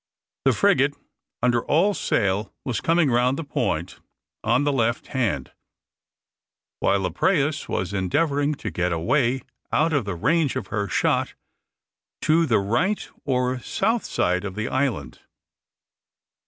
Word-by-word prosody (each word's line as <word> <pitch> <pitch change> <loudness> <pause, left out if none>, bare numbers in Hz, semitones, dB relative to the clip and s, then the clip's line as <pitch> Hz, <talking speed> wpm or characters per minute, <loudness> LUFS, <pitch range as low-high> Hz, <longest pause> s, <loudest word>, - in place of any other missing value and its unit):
The - - +5
frigate, - - +3 0.5
under 120 -1 +3
all 180 +8 +3
sail, 100 - 0
was 125 -4 -2
coming 165 -4 +3
round 125 +3 +2
the 165 - -3
point 100 - -2 0.4
on 120 +5 +2
the 145 0 +1
left 115 -2 0
hand, 110 - -1 1.3
while 100 -1 +2
the 90 - -1
prahus 150 - +1
were 95 - 0
endeavouring 145 - +1
to 110 -6 -5
get 90 +2 -1
away 120 - +1 0.3
out 160 +1 +2
of 140 -7 +1
the 100 -3 -3
range 155 - +1
of - - -4
her 100 -2 -1
shot - - 0 0.9
to 165 +1 +3
the 115 - +3
right 140 - 0 0.2
or 125 -1 0
south 225 - 0
side 90 +1 0
of 95 -2 -5
the 110 +2 -2
island. 130 -1 -2
125 Hz, 140 wpm, -24 LUFS, 100-150 Hz, 1.3 s, The